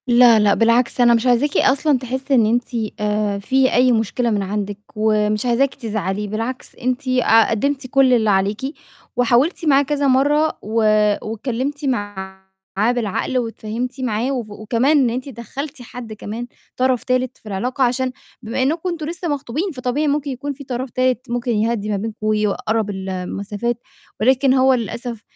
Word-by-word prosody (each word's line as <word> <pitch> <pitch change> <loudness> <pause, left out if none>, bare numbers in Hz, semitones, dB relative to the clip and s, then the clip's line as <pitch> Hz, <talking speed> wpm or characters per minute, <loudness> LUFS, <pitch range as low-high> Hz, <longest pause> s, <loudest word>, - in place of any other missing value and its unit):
لا، 240 -2 +6
لأ، 205 -1 +4
بالعكس، 235 +2 +2
أنا 240 -1 +6
مش 235 +2 +1
عايزاكِ 250 +4 +2
أصلًا 280 +1 +3
تحسّي 260 +2 -3
إن 230 -3 +5
أنتِ 235 +2 +1 0.3
آآ، 210 -1 0
في 260 +5 +2
أي 250 +1 +4
مشكلة 235 +1 0
من 210 -2 0
عندِك، 205 +1 -3 0.2
ومش 215 0 +1
عايزاكِ 250 +3 +2
تزعلي، 210 -4 -3
بالعكس 225 +5 -4
أنتِ 255 +2 -2
آآ، 250 -3 +4
قدّمتِ 265 +4 -1
كُلّ 265 0 +4
اللي 220 -3 +3
عليكِ، 195 +1 +1 0.5
وحاولتِ 245 +8 +2
معاه 280 -2 +5
كذا 285 0 0
مرّة، 290 +4 +2
و 215 - -8 0.5
واتكلّمتِ 255 +6 -3
معاه 205 -6 -3 0.5
بالعقل 240 +1 -1
واتفاهمتِ 240 +2 -4
معاه، 240 +1 -1
وف 245 -5 -3
وكمان 230 +8 +1
إن 260 -4 +3
أنتِ 255 +4 -4
دخّلتِ 265 +3 -7
حد 245 -2 -8
كمان، 220 +3 -6 0.3
طَرَف 255 -1 +1
تالت 255 -1 -1
في - - -31
العلاقة، 250 +7 -1
عشان 255 +1 +1 0.3
بما 230 +2 -2
إنكم 325 +6 0
أنتم 330 -3 -4
لسّه 340 +2 -4
مخطوبين، 290 +5 -2
فطبيعي 255 +3 -1
ممكن 285 0 0
يكون 280 +3 -4
فيه 280 +1 -11
طَرَف 255 +1 -4
تالت 255 0 0
ممكن 245 +1 -1
يهدِّي 220 -1 0
ما 205 - 0
بينكم، 220 +2 -5
ويقرَّب 215 +1 0
المسافات، 200 +4 -3 0.4
ولكن 260 +3 +4
هو 265 0 +4
للأسف 235 -1 -4
245 Hz, 160 wpm, -20 LUFS, 215-265 Hz, 0.5 s, لا